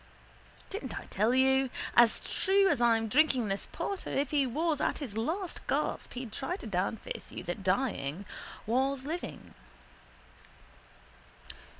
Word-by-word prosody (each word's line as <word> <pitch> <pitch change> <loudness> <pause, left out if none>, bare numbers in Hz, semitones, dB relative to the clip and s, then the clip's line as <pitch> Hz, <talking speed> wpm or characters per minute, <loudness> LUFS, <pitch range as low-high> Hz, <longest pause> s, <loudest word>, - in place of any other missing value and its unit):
Didn't 405 +3 -4
I - - -11
tell 215 +4 +2
you? 265 0 +4 0.3
As 235 -1 +6
true 390 0 +3
as 245 - +1
I'm 225 -1 +4
drinking 255 -2 +3
this 195 0 -2
porter 395 -2 -3
if 275 -1 0
he 285 -3 +3
was 305 +4 0
at - - +1
his 255 -9 -5
last 335 - -2
gasp - - -1
he'd 245 -3 -5
try 270 +10 -3
to 380 - -9
downface 195 +2 -3
you - - -6
that 175 +4 -4
dying 190 - 0 0.4
was 265 +3 +1
living. 335 +4 -5
260 Hz, 135 wpm, -31 LUFS, 220-300 Hz, 0.4 s, As